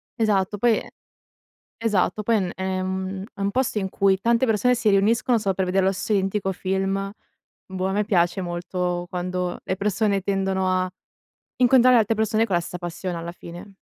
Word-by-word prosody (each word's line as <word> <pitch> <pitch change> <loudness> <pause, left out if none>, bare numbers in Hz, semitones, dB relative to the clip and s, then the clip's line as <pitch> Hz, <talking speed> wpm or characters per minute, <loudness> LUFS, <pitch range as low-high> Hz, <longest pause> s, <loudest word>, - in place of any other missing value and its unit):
esatto 205 -2 +1
poi 230 +1 +2 1.0
esatto, 210 -1 +1
poi 230 +2 +1
è - - +3
n 185 -3 -2
è 190 0 -2
un 190 0 -3
è - - -16
un 200 - +1
posto 250 -2 0
in 190 -1 -3
cui 190 0 +2
tante 235 +4 +2
persone 240 +3 +2
si 230 -3 +1
riuniscono 225 +4 +3
solo 195 -3 -1
per 190 - 0
vedere 185 +1 +1
lo 190 - +3
se 190 +3 -2
identico 195 0 0
film, 195 +1 -2 0.5
boh, 190 0 -3
a - - -1
me 210 +1 +1
piace 175 -1 +1
molto 175 0 -3
quando 180 0 -3
le 185 - -2
persone 200 0 0
tendono 190 -1 0
a 185 0 0 0.7
incontrare 255 0 +6
altre 225 0 +3
persone 220 +1 +1
con 200 - -4
la 175 - +2
stessa 180 - -6
passione 175 0 -5
alla 170 +1 -5
fine. 175 +3 -11
195 Hz, 185 wpm, -23 LUFS, 185-210 Hz, 1.0 s, incontrare